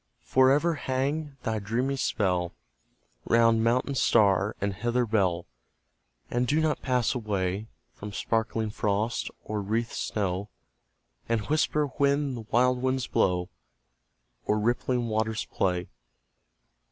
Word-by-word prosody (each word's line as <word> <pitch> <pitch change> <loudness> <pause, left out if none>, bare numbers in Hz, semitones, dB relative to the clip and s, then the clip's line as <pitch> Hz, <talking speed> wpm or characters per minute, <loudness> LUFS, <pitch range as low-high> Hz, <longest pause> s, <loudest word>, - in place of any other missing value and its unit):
For 130 0 +4
ever 150 +5 +3
hang 140 +1 -2
thy 110 -1 -1
dreamy 120 +7 -1
spell 90 -8 0 0.7
Round 115 -1 +4
mountain 125 +4 +1
star 105 -5 +3
and 100 0 -1
heather 120 +4 0
bell, 95 -6 +1 0.9
And 125 +1 +1
do 150 +4 +2
not 155 -1 0
pass 125 -3 +1
away 105 -3 -2 0.3
From 105 0 -8
sparkling 110 0 -1
frost, 105 +2 -1
or 105 -1 -3
wreathed 115 +4 -1
snow, 100 -1 -2 0.8
And 115 -2 +1
whisper 150 0 +2
when 140 0 +1
the 115 -3 -7
wild 125 +1 +3
winds 130 -1 0
blow, 90 -4 +1 0.9
Or 105 - +1
rippling 120 +2 0
waters 110 0 -1
play. 90 -2 -1
115 Hz, 120 wpm, -27 LUFS, 105-130 Hz, 0.9 s, For